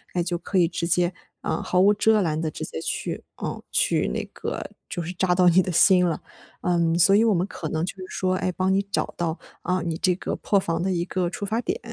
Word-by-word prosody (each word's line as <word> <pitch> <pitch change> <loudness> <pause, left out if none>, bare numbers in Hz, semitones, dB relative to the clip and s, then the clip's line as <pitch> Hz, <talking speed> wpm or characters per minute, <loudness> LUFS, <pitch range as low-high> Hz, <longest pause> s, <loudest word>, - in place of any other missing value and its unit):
诶， 175 - +1
就 175 0 -1
可 190 +3 -3
以 175 - +5
直 170 0 -3
接， 175 0 +2 0.3
啊， 160 - -2
毫 180 - 0
无 205 +2 +6
遮 215 0 +3
拦 155 -3 0
地 160 -1 -1
直 - - -7
接 - - -5
去， - - -3
啊， - - -4
去 - - +2
那 - - -2
个 - - -4 0.2
就 175 - -3
是 170 - -5
扎 180 0 +1
到 180 -1 +5
你 185 +2 +5
的 185 - -3
心 180 +1 +6
了。 165 - -2 0.4
嗯， 170 -2 +1
所 185 +3 +6
以 220 - +5
我 220 - +4
们 180 0 +1
可 165 - -6
能 160 +2 -1
就 195 - -6
是 185 - -7
说， 185 0 0
诶， 185 - -1
帮 185 +2 +1
你 195 - +3
找 200 - -2
到， 165 -1 -1 0.3
啊， 180 +1 0
你 165 -1 -3
这 180 +1 +2
个 - - -4
破 205 - +1
防 165 -2 -2
的 190 - 0
一 175 -2 0
个 180 -2 -1
出 200 - -5
发 220 +3 -1
点。 245 - -2
180 Hz, 270 characters per minute, -24 LUFS, 170-190 Hz, 0.4 s, 无